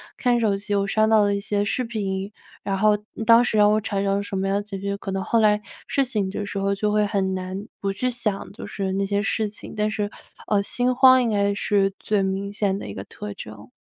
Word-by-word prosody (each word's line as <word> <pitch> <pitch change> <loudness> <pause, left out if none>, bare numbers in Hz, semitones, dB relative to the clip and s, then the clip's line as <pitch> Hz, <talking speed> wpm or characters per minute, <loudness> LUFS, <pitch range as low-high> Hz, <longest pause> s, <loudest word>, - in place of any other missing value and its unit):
看 245 -2 +2
手 210 -3 +2
机 205 +1 -4
我 200 0 +1
刷 215 +2 +3
到 220 -1 +5
了 200 0 +1
一 200 - -1
些 205 0 -1
视 250 +5 0
频， 200 -3 -3 0.3
然 195 -1 -1
后 210 +1 +4 0.3
当 230 +1 +7
时 220 - 0
让 210 0 +6
我 215 - +2
产 200 -2 -2
生 195 0 +2
了 200 - -1
什 195 -1 -4
么 195 - -1
样 195 - +1
的 205 - 0
情 200 -2 -7
绪， 200 +1 -2
可 195 -1 -6
能 190 0 -2
后 230 +3 +2
来， 210 -1 +4 0.3
睡 275 - +2
醒 215 -7 0
的 205 +1 -4
时 205 - -5
候 195 0 +1
就 210 +1 0
会 210 0 +3
很 195 -2 0
难 185 +1 -4 0.2
不 195 - 0
去 250 +6 -1
想， 220 -5 -2
就 - - -8
是 190 -2 -3
那 195 0 0
些 200 +1 0
事 215 +1 0
情， 205 - -10
但 210 0 0
是， 210 -1 -2 0.4
呃， 200 -1 +2
心 245 +4 0
慌 260 0 +7
应 235 - +1
该 200 -1 +1
是 200 -1 +1
最 210 -2 0
明 195 +1 -2
显 200 -2 0
的 - - -7
一 100 - -6
个 95 - -6
特 105 +1 -8
征。 110 +2 -10
205 Hz, 275 characters per minute, -23 LUFS, 195-215 Hz, 0.4 s, 当